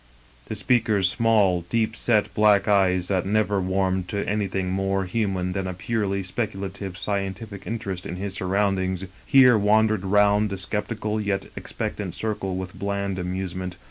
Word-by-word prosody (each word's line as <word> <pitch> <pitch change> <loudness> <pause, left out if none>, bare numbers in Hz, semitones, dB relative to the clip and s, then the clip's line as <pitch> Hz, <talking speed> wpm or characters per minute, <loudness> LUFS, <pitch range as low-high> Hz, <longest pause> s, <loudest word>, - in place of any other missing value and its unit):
The - - -4
speaker's 105 -2 +2
small, 105 -5 +3
deep 110 -1 0
set, 110 -2 +1
black 105 -2 +4
eyes, 95 -3 +3
that 95 -3 +1
never 105 0 +1
warmed 95 0 0
to 100 +2 -3
anything 95 -2 -1
more 95 0 0
human 95 -3 -1
than 95 0 -2
a 90 - -4
purely 100 0 -1
speculative 95 -1 -4
scientific 100 +1 -4
interest 100 -5 -4
in 85 - -5
his 95 +1 -4
surroundings, 95 -1 0 0.2
here 125 -4 +7
wandered 110 0 +3
round 105 +2 +3
the 100 - -4
skeptical 105 +2 -2
yet 100 -2 -1
expectant - - -5
circle 100 -4 -3
with 95 -1 -5
bland 100 -1 -2
amusement. 90 0 -4
100 Hz, 145 wpm, -24 LUFS, 95-105 Hz, 0.2 s, here